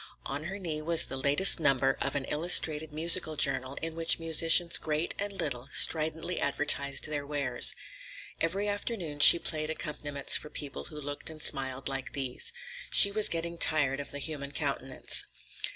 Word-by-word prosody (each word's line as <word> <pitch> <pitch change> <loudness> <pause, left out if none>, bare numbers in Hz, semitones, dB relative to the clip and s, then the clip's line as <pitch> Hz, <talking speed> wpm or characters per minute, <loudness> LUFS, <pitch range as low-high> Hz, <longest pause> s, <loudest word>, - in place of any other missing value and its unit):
On 145 +3 -7
her 190 +3 -8
knee 165 -6 -7
was 165 +1 +4
the - - -8
latest 145 +9 +6
number 135 -3 0
of - - -3
an 140 -2 -4
illustrated 155 -1 +3
musical 155 0 +3
journal 135 -2 -3
in 165 0 -5
which 165 0 +3
musicians 165 +1 +4
great 155 +2 -4
and 205 0 -5
little 140 -9 -6
stridently 160 +2 +2
advertised 140 -1 -1
their 150 -1 -5
wares. 140 -4 +1 0.6
Every 195 +5 -4
afternoon 205 -7 -7
she 145 - +9
played 155 -2 -4
accompaniments 145 -2 -2
for 150 - -10
people 145 -2 -8
who 150 -2 -11
looked 145 +1 -8
and 160 -1 -13
smiled 135 -2 -3
like 135 -1 -6
these. 135 -3 -5 0.4
She 200 - +4
was 210 +1 +3
getting 170 0 -6
tired 145 -3 +1
of 145 - -9
the 145 - -8
human 140 -1 -7
countenance. 140 -3 -3
150 Hz, 165 wpm, -27 LUFS, 140-165 Hz, 0.6 s, she